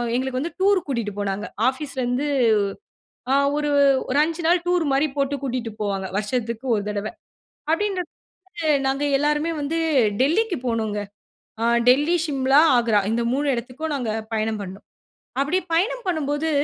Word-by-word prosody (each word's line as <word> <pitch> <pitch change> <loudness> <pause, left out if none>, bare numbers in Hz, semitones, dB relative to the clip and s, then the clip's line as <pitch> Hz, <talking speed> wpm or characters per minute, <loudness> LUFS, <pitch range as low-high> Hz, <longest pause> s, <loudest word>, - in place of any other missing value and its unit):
எங்களுக்கு 255 0 -1
வந்து 330 +2 -5
டூர் 390 -2 +3
கூட்டிட்டு 235 -7 -2
போனாங்க. 200 0 -2 0.2
ஆபீஸ்ல 270 0 -5
இருந்து, 250 +4 -1 1.0
அ, - - +4 0.2
ஒரு 295 0 0 0.4
ஒரு 275 +3 +2
5 330 +1 -4
நாள் 345 +1 +3
டூர் 355 -2 +2
மாரி 285 +3 +2
போட்டு 280 0 0
கூட்டிட்டு 245 -4 -3
போவாங்க 195 -2 -2
வருஷத்துக்கு 235 +2 -3
ஒரு 205 - -1
தடவ. 210 0 -3 0.6
அப்டின்ற 385 +2 0 0.6
போது 310 -4 +2
நாங்க 275 +2 0
எல்லோருமே 295 +3 +1
வந்து 300 +3 -2 0.4
டெல்லிக்கு 355 +7 +2
போனோங்க. 220 -3 -1 0.6
அ, - - +1 0.2
டெல்லி, 290 +7 +5
சிம்லா, 270 -1 +2 0.2
ஆக்ரா 230 -3 +3
இந்த 235 +1 0
3 290 +2 0
எடத்துக்கும் 255 +6 -4
நாங்க 250 -5 -3 0.2
பயணம் 220 0 -1
பண்ணினோம். 195 +1 -8 0.6
அப்டி 295 +7 +1
பயணம் 470 +10 +1
பண்ணும்போது 310 -2 -1
275 Hz, 145 wpm, -23 LUFS, 235-320 Hz, 1.0 s, டெல்லி